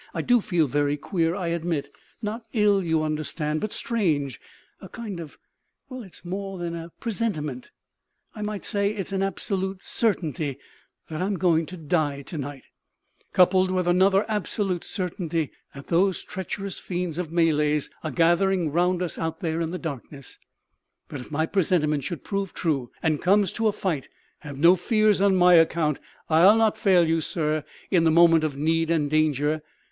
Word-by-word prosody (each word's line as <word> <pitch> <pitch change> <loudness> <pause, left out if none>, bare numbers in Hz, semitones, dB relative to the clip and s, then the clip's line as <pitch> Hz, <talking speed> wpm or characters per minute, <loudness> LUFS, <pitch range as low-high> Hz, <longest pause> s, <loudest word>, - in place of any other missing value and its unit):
I - - -1
do 245 -2 +4
feel 175 -5 +1
very 145 +1 0
queer, 165 +1 -1
I 180 -4 -2
admit; 170 -3 -2 0.3
not 220 +2 -4
ill, 210 -3 +3
you 160 -2 +1
understand, 155 0 -2
but 215 - -3
strange; 155 - -1 0.4
a - - -10
kind 210 -6 -6
of 160 -4 -9 0.5
well, 255 -1 -7
it's 190 -4 -13
more 195 +2 -4
than 170 -1 -4
a 165 0 -6
presentiment; 170 - -3 0.6
I 215 - -8
might 210 -1 -4
say 200 -2 0
it's 195 -2 -4
an 195 -1 -1
absolute 195 -1 -2
certainty 160 - -1 0.5
that 155 0 -5
I'm 195 +2 0
going 165 -2 +2
to 180 - -8
die 150 -3 -1
to 155 +3 -6
night, 140 -1 -6 0.7
coupled 185 +1 +4
with 185 -1 0
another 190 +3 +4
absolute 200 -3 -2
certainty 170 -4 -3 0.2
that 140 - -9
those 185 +2 +2
treacherous 195 +1 -5
fiends 175 -2 -3
of 170 -3 -4
Malays 150 -3 +1
are 160 - -2
gathering 170 +2 +2
round 180 +3 +1
us 175 - -4
out 160 0 -3
there 165 -1 -1
in 165 - -1
the 180 - -4
darkness. 140 -4 -7 0.7
But 145 - -6
if 125 - -10
my 155 +1 0
presentiment 160 -6 +1
should 170 0 -5
prove 195 -3 -3
true, 140 -8 -1
and 155 -2 +1
it - - -12
comes 195 0 +3
to 225 -1 0
a - - +3
fight, 170 -9 -3 0.3
have 145 -2 -9
no 170 +5 +6
fears 215 +2 +2
on 200 -1 +4
my 180 -1 +6
account. 165 -3 +3 0.3
I'll 175 +7 +6
not 220 -1 +3
fail 195 -6 +4
you, 165 0 +1
sir, 155 -1 -1 0.3
in 175 -3 +4
the 165 - +4
moment 165 0 +5
of 145 -3 -2
need 165 +2 +1
and 160 -3 +2
danger. 155 0 +1
170 Hz, 175 wpm, -25 LUFS, 155-195 Hz, 0.7 s, no